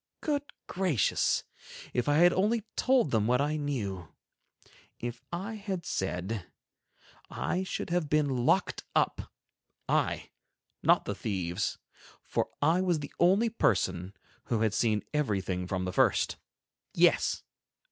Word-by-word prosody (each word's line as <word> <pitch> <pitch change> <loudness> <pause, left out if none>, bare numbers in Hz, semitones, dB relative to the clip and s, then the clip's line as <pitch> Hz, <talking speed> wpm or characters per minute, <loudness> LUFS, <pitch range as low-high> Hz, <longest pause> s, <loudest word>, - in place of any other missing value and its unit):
Good 290 -2 -1
gracious! 180 - +1 0.5
If 125 +3 0
I 145 - +4
had 175 +2 +6
only 210 +4 +1
told 255 - +3
them 110 -2 +2
what 125 +1 +3
I 145 +2 +1
knew—If 120 - -7
I 190 +6 -4
had 200 -5 -4
said—I 95 - -5
should 190 -2 -4
have 175 -4 0
been 145 -5 +1
locked - - +2
up—I, - - -2 0.5
not - - +4
the - - -2
thieves—for 95 -2 -4
I 165 +5 +4
was 180 -3 +2
the 140 - -8
only 195 +7 +4
person 95 - 0 0.3
who 115 -3 0
had 110 -2 +2
seen 110 -3 +1
everything 95 -10 -1
from 95 0 -2
the 90 - -3
first. - - +2 0.6
Yes! - - +3
140 Hz, 115 wpm, -30 LUFS, -, 0.6 s, had